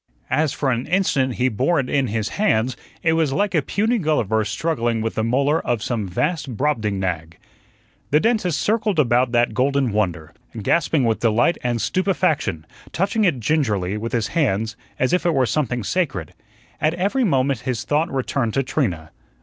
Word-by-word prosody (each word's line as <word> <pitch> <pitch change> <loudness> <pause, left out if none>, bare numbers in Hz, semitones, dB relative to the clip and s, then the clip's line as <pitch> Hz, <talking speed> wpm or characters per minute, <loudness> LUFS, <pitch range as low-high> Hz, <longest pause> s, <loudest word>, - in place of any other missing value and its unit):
As 155 -2 +2
for 140 -2 -1
an 120 +1 -2
instant 140 -9 +1
he 125 - +1
bore 130 +9 +1
it 130 - -1
in 135 -1 +1
his 110 -1 -2
hands, 130 - +1 0.3
it 160 - +3
was 160 -3 +1
like 200 +7 0
a 160 - +3
puny 220 - 0
Gulliver 115 - +1
struggling 120 0 -1
with 115 - -2
the 110 - -1
molar 140 +7 +1
of 120 -4 -1
some 110 -5 -2
vast 140 - -2
Brobdingnag. 95 - -1 0.7
The 150 - +4
dentist 215 -6 +1
circled 215 -3 0
about 125 -3 +3
that 120 -1 +2
golden 135 +1 +1
wonder, 90 -7 -2 0.3
gasping 150 +5 +1
with 115 -1 +1
delight 120 +8 +2
and 120 -1 -1
stupefaction, 160 - 0 0.3
touching 200 +4 +1
it 160 -9 +1
gingerly 105 - 0
with 115 +2 -4
his 115 -3 0
hands 115 -7 0 0.2
as 130 - +1
if 180 - +2
it 170 -3 +1
were 130 -1 +3
something 125 -3 -1
sacred. 135 - -2 0.5
At 155 +2 +2
every 200 +9 0
moment 135 - +1
his 125 0 -3
thought 155 +3 0
returned 130 -3 -1
to 135 - +2
Trina. 90 - -2
130 Hz, 175 wpm, -21 LUFS, 110-160 Hz, 0.7 s, The